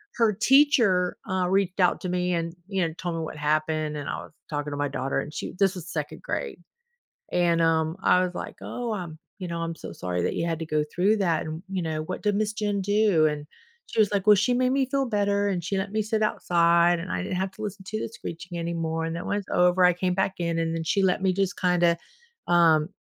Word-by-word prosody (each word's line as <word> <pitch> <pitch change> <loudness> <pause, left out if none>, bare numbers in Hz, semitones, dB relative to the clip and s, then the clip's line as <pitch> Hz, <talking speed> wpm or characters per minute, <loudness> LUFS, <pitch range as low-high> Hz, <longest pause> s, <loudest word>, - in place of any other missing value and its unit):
her 230 -3 +3
teacher, 230 -6 +4
uh, 185 -1 +1
reached 195 -1 +1
out 180 -2 +3
to 185 - -3
me 180 0 0
and, 165 0 -2
you 195 -2 -1
know, 160 - -7
told 175 -2 -3
me 165 - -2
what 160 -1 -6
happened, 155 0 0
and 145 - -5
I - - -2
was - - -14 0.2
talking 145 -1 -3
to 145 - -4
my 145 0 0
daughter 130 +1 -2
and 150 - -6
she - - -5
this 195 -1 +3
was 175 -2 -8
2nd 155 0 -4
grade, - - -3 0.7
and, 170 -1 +2
um, 160 0 +2
I 180 0 +5
was 180 -1 -3
like, - - -6
"Oh, 240 -2 -4
um, 175 -6 -6 0.2
you 185 - -4
know, 170 -1 -4
I'm 165 0 -3
so - - -8
sorry 90 -1 -3
that - - -1
you - - -1
had 165 -1 -2
to 165 - -4
go 155 -1 +1
through 200 +5 +3
that 175 -6 +1
and, 160 +2 -6
you 190 -1 -2
know, 160 -2 -2
what 185 +4 -5
did 210 -1 +2
Miss 215 0 0
Jane 205 -2 -1
do?" 205 -5 +3
And, 150 -1 -3 0.4
she - - -3
was 210 -2 +4
like, 200 -2 0
"Well, 210 - +9
she 210 +5 +2
made 255 +1 +2
me 270 0 +2
feel 270 +1 0
better, 205 -3 +1
and 180 -3 -1
she 195 +4 -2
let 195 +1 -2
me 215 +1 0
sit 215 +1 -1
outside, 170 -3 +3
and 185 +2 -5
I - - -2
didn't 185 - -3
have 190 0 -1
to 215 - -11
listen 200 -2 -5
to 215 0 -3
the - - -3
screeching 175 -5 -7
anymore 165 -1 -2
and 165 - -3
then 170 - -5
when 205 - 0
it's 200 - -10
over 180 +1 +4
I 180 - +6
came 180 +1 -1
back 190 +1 0
in 170 -1 -1
and 165 0 -1
then 165 - -2
she 195 +4 +1
let 185 0 +2
me 190 -1 +2
just 195 +1 -1
kinda, 175 -2 +3 0.5
um, 165 -3 +4
180 Hz, 255 wpm, -26 LUFS, 165-200 Hz, 0.7 s, Well